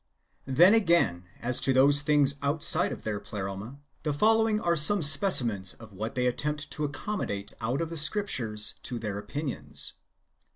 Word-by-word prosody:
Then, 170 +9 +4
again, 170 - +1 0.2
as 125 +1 -1
to 135 - +2
those 140 +2 +5
things 145 -2 +3
outside 145 +2 +2
of - - -8
their 105 -2 -4
Pleroma, 100 +6 -8 0.2
the 150 - -3
following 220 +4 +2
are 170 -4 -1
some 170 +4 +5
specimens 140 - +4
of 110 -3 -15
what 110 +4 -6
they 125 -1 -1
attempt 150 +4 -3
to 150 - -4
accommodate 140 - -5
out 120 +7 -2
of 165 0 -5
the 165 - -5
Scriptures 130 - -2
to 125 - -3
their 105 -3 -5
opinions. 140 +7 -3
140 Hz, 160 wpm, -26 LUFS, 110-160 Hz, 0.2 s, those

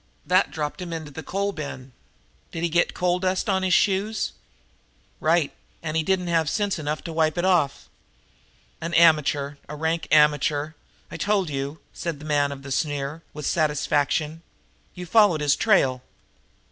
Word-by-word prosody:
"That - - +3
dropped 150 +3 -4
him 175 -1 -6
into 160 -3 -6
the 160 - -7
coal 200 +6 -2
bin. 140 -6 -7 0.6
Did 165 - -5
he 170 - +1
get 175 +2 +1
coal 180 0 +1
dust 185 +2 0
on 190 -2 +1
his 185 -2 +3
shoes?" 205 +2 +1 0.9
"Right; 160 -2 +2 0.3
and 155 -1 -3
he 160 - +3
didn't 185 +2 0
have 165 -3 +1
sense 205 -3 -1
enough 150 0 -3
to 165 - -6
wipe 160 0 +1
it 175 - +1
off." 170 -7 +1 0.9
"An 165 +1 -3
amateur 150 -3 +4
a 150 - -5
rank 160 +2 -1
amateur! 150 0 +3 0.4
I - - -6
told 200 -6 0
you!" 140 +2 -4
said 170 -3 -4
the 150 - -11
man 145 -2 +1
of 135 -1 -8
the 140 - -8
sneer, 145 +2 -2
with 150 -1 -7
satisfaction. 150 0 0 0.5
"You 180 -1 -7
followed 190 -4 +4
his 145 -1 +3
trail?" 135 - +2
160 Hz, 165 wpm, -24 LUFS, 145-180 Hz, 0.9 s, amateur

